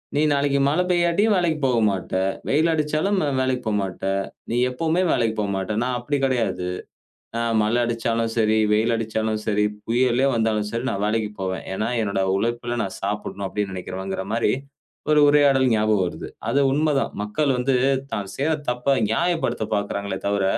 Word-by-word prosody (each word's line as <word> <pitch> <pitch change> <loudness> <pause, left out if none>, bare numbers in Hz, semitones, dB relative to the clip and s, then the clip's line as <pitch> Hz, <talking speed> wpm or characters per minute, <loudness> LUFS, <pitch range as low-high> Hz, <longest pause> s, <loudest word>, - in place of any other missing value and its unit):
நீ 145 - +3
நாளைக்கு 140 -1 +2
மழை 155 +6 +2
பெய்யாட்டியும் 175 +5 +3
வேலைக்கு 170 -4 +1
போமாட்ட. 110 -7 +1 0.4
வெயில் 155 +4 +3
அடிச்சாலும் 155 +6 0 0.2
வேலைக்கு 130 -1 0
போகமாட்ட. 100 -3 -2 0.5
நீ 115 - -1
எப்பவுமே 160 +7 0
வேலைக்கு 110 -1 +1
போகமாட்டா. 100 0 -2
நான் 125 0 -1
அப்படி 145 +4 -1
கிடையாது. 115 -8 -1 0.7
ஆ - - -1 0.2
மழை 110 +3 +1
அடிச்சாலும் 115 -1 -1
சரி, 110 -1 +3
வெயில் 110 +3 +2
அடிச்சாலும் 110 -1 -2
சரி, 105 -1 +2 0.2
புயலே 125 +2 +2
வந்தாலும் 110 -2 0
சரி 115 +2 -3
நான் 100 - -2
வேலைக்கு 110 0 0
போவேன். 95 0 -3
ஏன்னா, 110 +3 -1
என்னுடைய 100 -2 0
உழைப்பில 120 +3 -2
நான் 95 - -5
சாப்பிடணும் 100 0 -3
அப்படின்னு 100 -1 -3
நினைக்கிறவங்கற 95 +1 -5
மாரி 115 +1 +2 0.6
ஒரு 150 - +5
உரையாடல் 140 -3 +4
ஞாபகம் 105 -3 +2
வருது. - - -6 0.2
அது 140 - +2
உண்மதான். 145 -1 +1
மக்கள் 135 +7 0
வந்து 130 +1 +1 0.4
தான் 100 -2 -3
செய்ற 150 +4 +1 0.2
தப்ப 125 +3 +1
நியாயப்படுத்தப் 165 -4 0
பாக்கிறாங்களே 100 0 -2
தவிர, 100 -1 +1
115 Hz, 150 wpm, -23 LUFS, 105-140 Hz, 0.7 s, ஒரு